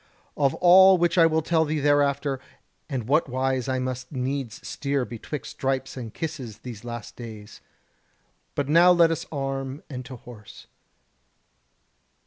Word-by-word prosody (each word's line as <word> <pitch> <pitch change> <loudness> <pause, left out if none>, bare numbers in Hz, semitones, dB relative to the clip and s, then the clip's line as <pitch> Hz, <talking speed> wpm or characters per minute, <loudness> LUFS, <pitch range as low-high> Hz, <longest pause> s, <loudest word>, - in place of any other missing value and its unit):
Of 140 -2 +1
all 190 +1 +7
which 175 0 +1
I 165 - +7
will 160 -1 +1
tell 160 0 +2
thee 155 0 -1
hereafter, 140 -1 +2 0.5
and 125 -6 -3
what 150 +2 +2
wise 130 0 -1
I 130 - 0
must 130 0 -4
needs 130 -3 -4
steer 140 -2 -1
betwixt 120 +5 -7
stripes 135 0 -2
and 120 -4 -6
kisses 135 -9 -6
these 115 -2 -9
last 120 -2 -7
days. 110 -3 -10 0.9
But 145 -2 -1
now 170 +4 +6
let 170 -2 +5
us 165 - -3
arm 135 -1 -4
and 130 -1 -5
to 130 +1 -8
horse. 115 -3 -13
135 Hz, 145 wpm, -25 LUFS, 125-155 Hz, 0.9 s, all